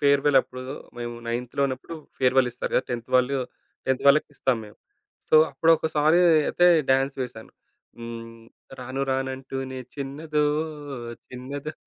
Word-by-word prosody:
ఫేర్వెలప్పుడు 140 -2 +3 0.4
మేము 120 0 -4
నైన్త్‌లో 120 +3 -2
ఉన్నప్పుడు 130 +5 -6 0.2
ఫేర్వెలిస్తారు 125 -1 +2
కదా! - - +3
10థ్ 120 -1 -4
వాళ్ళు 130 +2 +3 0.5
10థ్ 130 -1 0
వాళ్ళు - - +10
వాళ్ళకిస్తాం 140 -3 +2
మేము. 105 - -14 0.5
సో, - - +2 0.2
అప్పుడు 160 +4 +2
ఒకసారి 155 +1 +2 0.3
అయితే 175 - +3 0.2
డాన్స్ 135 +1 +2
వేశాను. 110 -3 -8 0.5
హ్మ్. 115 0 -8 0.4
రాను 130 +2 -4
రాను 130 0 0
అంటూనే 130 0 -6 0.2
చిన్నదో 150 +2 -2 0.8
చిన్నదో 140 +4 -6
130 Hz, 120 wpm, -25 LUFS, 125-140 Hz, 0.8 s, వాళ్ళు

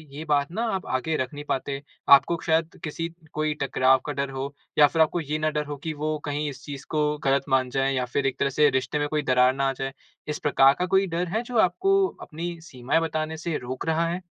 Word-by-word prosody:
ये 155 - -6
बात 145 0 +2
ना 220 +6 -2
आप 190 - -4
आगे 155 +5 -1
रख 130 +1 -3
नहीं 145 0 -7
पाते? 140 +1 -2 0.3
आपको 140 +5 +6
शायद 160 0 0
किसी 165 +2 -3 0.2
कोई 155 0 0
टकराव 130 -1 +3
का 145 - -3
डर 140 0 -2
हो 135 +1 -5 0.2
या 150 -1 +8
फिर 160 +2 +1
आपको 160 +2 +2
ये 150 +1 -2
ना 155 0 +1
डर 150 -1 -2
हो 145 -1 -6
कि 155 +2 -4
वो 155 +1 -2
कहीं 145 +1 -2
इस 135 +1 -10
चीज़ 140 -1 -7
को 150 -1 0
गलत 135 0 +2
मान 130 -1 +2
जाएँ 135 +1 0
या 125 -1 0
फिर 135 +3 -2
एक 130 - -3
तरह 140 - +2
से 150 +2 +4
रिश्ते 130 +2 -1
में 145 - 0
कोई 150 -1 0
दरार 125 -1 +4
ना 135 0 +1
आ - - -1
जाए, 135 +1 -4 0.3
इस 150 - -3
प्रकार 135 -1 +5
का 180 - +1
कोई 190 +1 +3
डर 175 +1 -2
है 220 +6 0
जो 245 -1 -4
आपको 390 - +3
अपनी 170 +2 -6
सीमाएँ 135 -1 -1
बताने 160 -1 -2
से 160 -1 -2
रोक 130 +1 -6
रहा 165 +1 +2
है? 180 +2 -3
150 Hz, 245 wpm, -25 LUFS, 135-160 Hz, 0.3 s, या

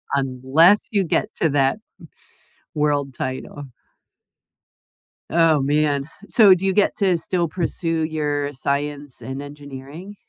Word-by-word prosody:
unless 135 +8 +3
you 200 -3 +2
get 210 +5 0
to 160 - +1
that 135 +3 +1 1.0
world 145 -3 0
title. 130 +3 -5 1.7
Oh, 160 -3 +4
man. 145 0 +1 0.2
So, 200 -5 +6
do 190 +2 -4
you 190 - +2
get 205 - +2
to 190 -3 +2
still 170 0 -1
pursue 165 -1 -2
your 145 -2 -2
science 140 -1 -3
and 130 +4 -6
engineering? 145 +6 -10
150 Hz, 115 wpm, -21 LUFS, 140-170 Hz, 1.7 s, So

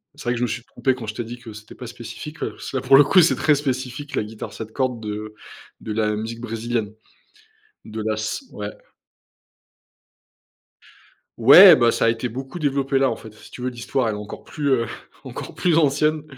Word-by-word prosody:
C'est 145 - -12
vrai 120 - +1
que - - -3
je 125 - -1
me - - +2
suis 120 +2 -4
trompé 130 +1 -1
quand 120 -4 -8
je 110 - -5
t'ai 120 - -3
dit 120 +2 -8
que 115 -3 -10
c'était 105 0 -12
pas 125 - -9
spécifique, 125 +6 -9
parce - - -5
que, 135 - -2
là, - - -3
pour 135 - +7
le 145 - +8
coup, 180 +6 +5
c'est 170 - +4
très 150 -2 +3
spécifique, 135 0 -4
la - - 0
guitare 110 +1 -8
7 110 -1 -8
cordes 125 -2 -1
de 105 0 -5 0.5
de 110 - -6
la 105 0 0
musique 110 +2 -5
brésilienne, 115 -2 -3 0.9
de 110 0 -6
la 110 0 0
s 110 - -4
ouais. - - -5 2.7
Ouais, 185 -5 +10
bah 120 -3 +4
ça - - 0
a - - +4
été 115 +2 -2
beaucoup 130 +7 -7
développé 140 -2 0
là, 135 -1 +3
en 115 - -3
fait, 110 -1 -12
si 110 - -16
tu 125 - -10
veux, 125 - -1
l'histoire, 120 +1 -2
elle 105 - -2
est - - -6
encore 105 - -9
plus, 145 -3 -3
heu, 120 -4 +2 0.4
encore - - -8
plus 170 -3 +2
ancienne. 150 0 +2
120 Hz, 215 wpm, -22 LUFS, 110-135 Hz, 2.7 s, Ouais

